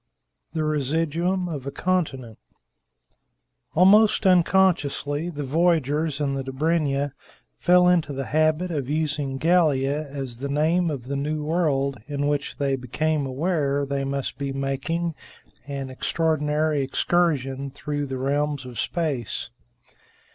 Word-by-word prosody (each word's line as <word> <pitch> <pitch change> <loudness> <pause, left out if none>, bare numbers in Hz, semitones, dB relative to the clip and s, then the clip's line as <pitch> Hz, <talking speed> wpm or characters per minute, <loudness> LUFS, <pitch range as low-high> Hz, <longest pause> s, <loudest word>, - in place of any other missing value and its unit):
THE 160 - -1
RESIDUUM 165 +5 0
OF 145 -5 -5
A - - -2
CONTINENT 140 - -2 1.4
Almost 205 +5 +5
unconsciously, 175 -4 +2
the 150 -4 -5
voyagers 155 -1 +1
in 140 -2 0
the 135 -1 -2
Dobryna 145 0 0 0.5
fell 180 0 +5
into 175 -4 +3
the 135 -1 -3
habit 155 +3 +1
of 140 -5 -3
using 150 -3 -1
Gallia 150 -3 +2
as 135 -4 -6
the 140 +1 -4
name 160 +5 +2
of 140 -5 -4
the 140 +2 -3
new 150 +2 -2
world 145 -5 0
in 145 -1 -2
which 145 -1 -1
they 140 -2 +1
became 145 +3 -1
aware 140 0 0
they 140 0 -2
must 135 0 -3
be 140 -1 -2
making 140 +5 -2 0.5
an 135 -2 -5
extraordinary 150 +1 0
excursion 135 -2 0
through 145 +1 -4
the 130 0 -4
realms 140 +1 -1
of 125 -2 -7
space. 145 -10 -2
145 Hz, 125 wpm, -24 LUFS, 135-165 Hz, 1.4 s, Almost